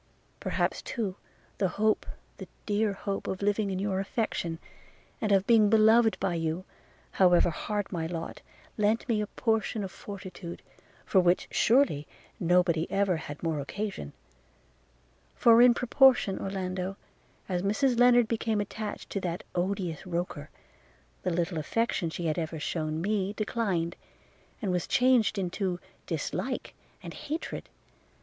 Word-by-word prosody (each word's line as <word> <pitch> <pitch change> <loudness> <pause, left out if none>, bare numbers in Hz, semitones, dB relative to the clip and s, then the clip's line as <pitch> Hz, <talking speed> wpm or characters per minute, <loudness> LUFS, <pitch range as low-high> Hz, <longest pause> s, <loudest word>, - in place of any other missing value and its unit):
– - - -37
Perhaps - - -1
too, 210 -6 -3 0.4
the 195 - +3
hope, 215 +1 +2 0.3
the - - -8 0.2
dear 210 0 +1
hope 195 0 -4
of 190 +1 -3
living 205 0 +1
in 190 - -2
your 190 0 -1
affection, 195 -5 -2 0.6
and 215 - 0
of 195 -1 +4
being 220 -2 +5
beloved 220 +1 +5
by 185 - 0
you, 165 +2 -2 0.5
however 180 -2 +4
hard 205 +5 -3
my 165 -3 -2
lot, 165 -1 -5 0.4
lent 215 +4 +2
me 220 -4 +1
a 210 - -2
portion 220 -1 0
of 190 - -5
fortitude, 190 -3 -8 0.4
for 190 - +4
which, 175 0 +2
surely, 225 - +3 0.3
nobody 175 -2 +2
ever 195 -2 +1
had 145 -1 -8
more 160 -3 0
occasion: 165 - -5 1.2
for 230 0 +6
in 245 0 +8
proportion, 250 -5 +4
Orlando, 190 0 -3 0.5
as 180 -2 -1
Mrs 235 +5 +1
Lennard 245 -1 +6
became 225 -1 0
attached 205 +1 -5
to 200 - -2
that 175 -1 -3
odious 180 -2 -2
Roker, 170 -4 -3 0.7
the - - -1
little 170 -1 -1
affection 185 +1 0
she 170 +1 -5
had 155 +1 0
ever 160 -1 -3
shewn 155 0 -2
me 200 -1 0
declined, 200 -6 -1 0.7
and 195 - 0
was 180 -1 -1
changed 250 -4 +3
into 185 -1 -2 0.3
dislike - - -3 0.3
and - - -7
hatred. 315 +3 -5
195 Hz, 140 wpm, -29 LUFS, 175-215 Hz, 1.2 s, in